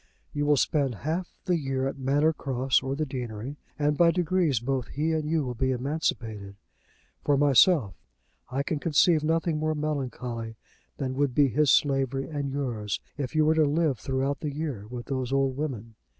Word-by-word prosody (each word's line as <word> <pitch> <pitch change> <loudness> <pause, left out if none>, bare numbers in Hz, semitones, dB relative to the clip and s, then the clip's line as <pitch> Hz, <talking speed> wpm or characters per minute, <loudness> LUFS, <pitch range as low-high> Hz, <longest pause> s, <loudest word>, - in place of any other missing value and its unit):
You 145 0 -1
will 145 -1 +4
spend 140 -3 +1
half 170 +4 -2
the 180 -3 +1
year 135 -2 -1
at 135 - -5
Manor 145 +4 +2
Cross 130 -3 +1
or 135 +1 -2
the 155 +2 -1
deanery, 125 0 -5 0.2
and 150 0 +1
by 170 -1 +7
degrees 170 -6 +1
both 130 +1 -2
he 155 +3 -1
and 155 -1 -1
you 160 -2 +1
will 125 - -3
be 130 +2 0
emancipated. 120 -7 -2 0.7
For 145 -1 +3
myself, 140 - +5 0.6
I 135 +2 -1
can 150 +1 -2
conceive 155 +1 +3
nothing 165 0 +1
more 155 0 0
melancholy 125 -6 -3 0.4
than 130 -2 -2
would 135 -2 0
be 145 -2 +5
his 150 +5 +2
slavery 135 -1 +2
and 145 -3 -3
yours 120 -7 -2 0.2
if 140 0 -4
you 155 -1 +4
were 155 - +4
to 160 -1 +4
live 150 -3 +1
throughout 135 +1 -1
the 150 - -3
year 140 -9 -4
with 120 -1 -6
those 130 -1 -3
old 135 -1 +1
women." 125 -6 -4
140 Hz, 180 wpm, -27 LUFS, 130-155 Hz, 0.7 s, by